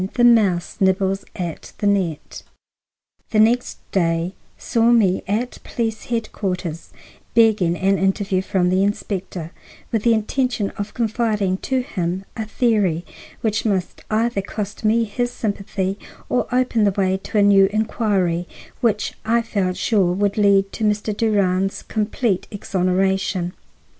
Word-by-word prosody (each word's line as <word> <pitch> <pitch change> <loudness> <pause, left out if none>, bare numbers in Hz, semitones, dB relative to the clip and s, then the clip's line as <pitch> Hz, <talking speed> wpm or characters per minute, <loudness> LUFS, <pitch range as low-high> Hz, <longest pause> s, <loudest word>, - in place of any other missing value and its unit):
THE 240 - +2
MOUSE 210 -8 +4
NIBBLES 190 0 +1
AT 170 -3 -5
THE - - -3
NET 190 -7 -1 0.9
The 215 - +1
next 235 +3 +3
day 170 -1 +1 0.2
saw 230 -1 +2
me 210 -6 +4
at 225 +5 -2
police 225 -2 -3
headquarters 190 -8 -3 0.5
begging 215 -7 +4
an 195 0 +2
interview 195 0 +1
from 185 -1 +1
the 185 +1 +2
inspector, 190 -4 -3 0.4
with 225 - +1
the 230 +1 +4
intention 220 -1 -1
of 205 +1 -6
confiding 220 -5 0
to 260 +5 -1
him 185 -5 -3
a 220 - -3
theory 210 -7 +1 0.4
which 220 -1 0
must 195 -5 -2
either 220 -1 +1
cost 205 +2 -6
me 225 +2 +3
his 245 +3 -2
sympathy 200 -3 -3 0.3
or 250 - +1
open 250 -3 +2
the 205 - +5
way 190 -1 +2
to 205 +3 -5
a 205 - +5
new 195 -1 +6
inquiry, 200 -5 0 0.3
which 215 -3 0
I 230 +1 +2
felt 190 -5 -1
sure 190 -3 +2
would 200 +1 0
lead 200 -2 +3
to 225 - -5
Mr. 210 0 0
Durand's 195 -3 +1
complete 215 -2 -1
exoneration. 190 -2 0
200 Hz, 140 wpm, -21 LUFS, 185-220 Hz, 0.9 s, new